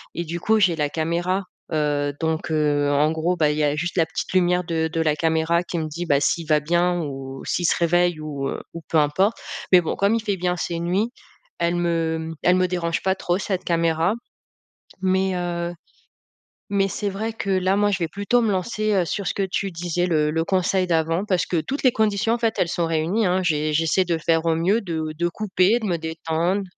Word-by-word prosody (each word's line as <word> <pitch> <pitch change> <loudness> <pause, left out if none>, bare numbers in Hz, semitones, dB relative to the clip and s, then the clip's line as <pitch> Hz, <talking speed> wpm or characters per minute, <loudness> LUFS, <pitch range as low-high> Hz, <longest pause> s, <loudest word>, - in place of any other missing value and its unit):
et 170 - -2
du 170 +1 -5
coup, 220 +5 +2
j'ai 185 -5 +3
la 150 -2 0
caméra, 175 +5 -1 0.3
heu, 145 -2 0
donc 160 0 -2
heu, 145 -2 +2
en 150 +2 +3
gros, 160 +3 0
bah, 155 -3 +2
il 150 - -3
y 155 - +1
a 145 0 +2
juste 175 +4 -3
la 165 - +4
petite 160 - -5
lumière 180 -1 +3
de 160 -2 -1
de 165 - 0
la 155 -2 +2
caméra 160 +2 +1
qui 175 - -4
me 160 -1 -2
dit, 170 +3 -5
bah, 140 -4 +3
s'il 150 +3 0
va 155 -1 +4
bien 175 +3 +1
ou 135 -3 -6
s'il 175 - -1
se - - +3
réveille 175 -1 +2
ou 145 -3 -4
heu, - - -4
ou 170 - -7
peu 165 - +2
importe 155 +9 +2 0.3
mais 180 -1 +7
bon, 160 - -2
comme 200 +3 +2
il 230 - 0
fait 200 -3 -1
bien 180 0 0
ses 170 -1 -3
nuits. 185 +7 0 0.5
Elle 170 +1 +1
me 165 -2 -1
elle 180 +2 +5
me 185 0 +2
dérange 170 -2 -1
pas 190 0 +2
trop, 175 -1 -1
cette 190 -2 -2
caméra 165 +1 +1 0.9
mais 190 0 +1
heu, 175 -1 -2 1.0
mais 195 -1 +2
c'est 200 +2 -3
vrai 215 +3 -3
que 200 -3 -5
là, 185 0 +2
moi, 205 0 +2
je 195 - -1
vais 170 - 0
plutôt 205 +7 +1
me 225 -3 +1
lancer, 215 +2 -1
heu, 185 -3 +2
sur 200 +2 -3
ce - - 0
que 195 - -1
tu 195 0 -1
disais, 175 +1 -1
le 150 -3 +2
le 165 +1 0
conseil 185 0 +1
d'avant, 165 +3 +1
parce 185 -4 +1
que 175 - -1
toutes 275 - -4
les 255 - +5
conditions, 215 0 +1
en 240 - +1
fait, 225 -1 0
elles 170 - +1
sont 170 0 0
réunies, 165 +7 0
hein. 185 +1 +2
J'ai 155 -2 0
j'essaie 165 +4 +2
de 170 -2 0
faire 165 +1 +1
au 165 -1 +2
mieux 190 +8 +2
de 165 -6 -3
de 175 - +1
couper, 195 +3 +1
de 220 - -5
me 175 - 0
détendre. 165 +4 -1
175 Hz, 230 wpm, -23 LUFS, 160-190 Hz, 1.0 s, mais